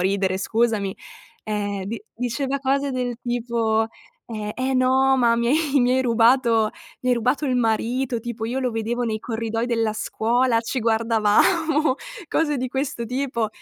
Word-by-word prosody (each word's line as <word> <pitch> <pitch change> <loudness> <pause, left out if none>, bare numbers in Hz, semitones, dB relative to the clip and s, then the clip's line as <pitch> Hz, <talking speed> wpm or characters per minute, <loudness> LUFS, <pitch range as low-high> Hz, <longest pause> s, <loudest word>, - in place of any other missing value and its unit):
ridere 190 0 +1
scusami, 215 -1 0 0.5
ehm, 205 -2 -2
di 225 - -5
diceva 255 +3 -2
cose 275 +1 0
del 250 -2 -2
tipo, 235 -2 0 0.4
ehm: 215 -2 -5
"Eh 260 +1 -1
no, 260 +1 +3
ma 235 -2 +3
mi 235 0 0
hai 295 0 +2
mi 245 0 +3
hai 260 - +2
rubato 230 -2 +3 0.3
mi 255 - -1
hai - - +5
rubato 250 +5 0
il 255 -2 +1
marito, 240 +2 0
tipo 225 -1 -5
io 240 +4 -2
lo 255 -1 0
vedevo 230 +2 -2
nei 220 -2 -1
corridoi 225 0 -2
della 230 -3 0
scuola, 230 +2 +1
ci 230 +3 -3
guardavamo," 230 - +2 0.3
cose 300 -2 +1
di 255 0 -2
questo 265 -2 -3
tipo. 250 -2 -2
235 Hz, 160 wpm, -23 LUFS, 225-260 Hz, 0.5 s, hai